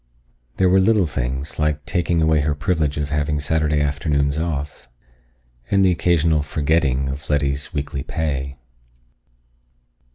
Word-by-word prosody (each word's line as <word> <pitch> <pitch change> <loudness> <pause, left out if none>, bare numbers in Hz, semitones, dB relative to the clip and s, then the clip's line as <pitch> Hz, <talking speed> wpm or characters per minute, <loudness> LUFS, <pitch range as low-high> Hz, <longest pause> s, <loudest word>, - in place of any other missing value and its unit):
There 95 - +3
were 95 +1 +4
little 100 0 +3
things, 65 0 -3
like 75 -1 0
taking 85 -2 0
away 80 -1 +3
her 75 0 0
privilege 75 -1 -1
of 75 -1 -2
having 75 0 0
Saturday 75 0 0
afternoons 70 -1 0
off. 75 -6 -4 0.8
And 100 -1 +3
the 95 - +4
occasional 80 -2 +2
"forgetting" 75 -3 0
of 70 +2 -6
Letty's 70 -1 0
weekly 70 -2 -3
pay. 70 -4 -3
75 Hz, 130 wpm, -21 LUFS, 70-80 Hz, 0.8 s, were